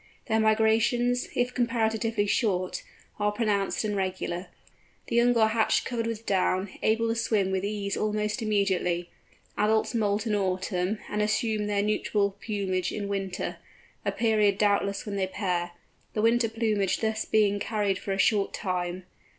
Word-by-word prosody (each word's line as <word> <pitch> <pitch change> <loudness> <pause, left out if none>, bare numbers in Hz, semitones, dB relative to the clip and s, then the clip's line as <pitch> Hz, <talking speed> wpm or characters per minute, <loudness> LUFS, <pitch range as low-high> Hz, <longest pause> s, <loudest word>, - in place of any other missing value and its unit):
Their 220 -1 +1
migrations, 225 +3 +2
if 245 0 0
comparatively 225 -3 0
short, 190 -4 0 0.4
are 210 0 +2
pronounced 210 -2 0
and 210 -1 -1
regular. 185 -1 -2 0.6
The - - -3
young 240 0 +4
are 220 -1 +5
hatched 220 0 +2
covered 230 -2 -2
with 230 0 -4
down, 190 0 +1
able 225 +1 +2
to - - +2
swim 215 -4 +1
with 190 0 -1
ease 200 -1 -2
almost 210 +2 -1
immediately. 190 -5 0 0.5
Adults 215 +3 +2
moult 210 -1 0
in 220 - 0
autumn, 190 0 0
and 210 - -1
assume 215 0 0
their 205 -1 +1
nuptial 210 -1 +1
plumage 195 -4 -1
in 205 -1 -4
winter—a 195 -2 -5
period 215 -3 +2
doubtless 200 -1 +1
when 205 -2 -4
they 190 -1 0
pair—the 180 +1 -4
winter 230 0 +3
plumage 215 -4 0
thus 220 -1 -1
being 205 -2 +2
carried 205 -3 -1
for 195 - -5
a 195 - 0
short 200 0 +2
time. 180 -1 -3
210 Hz, 150 wpm, -27 LUFS, 195-220 Hz, 0.6 s, are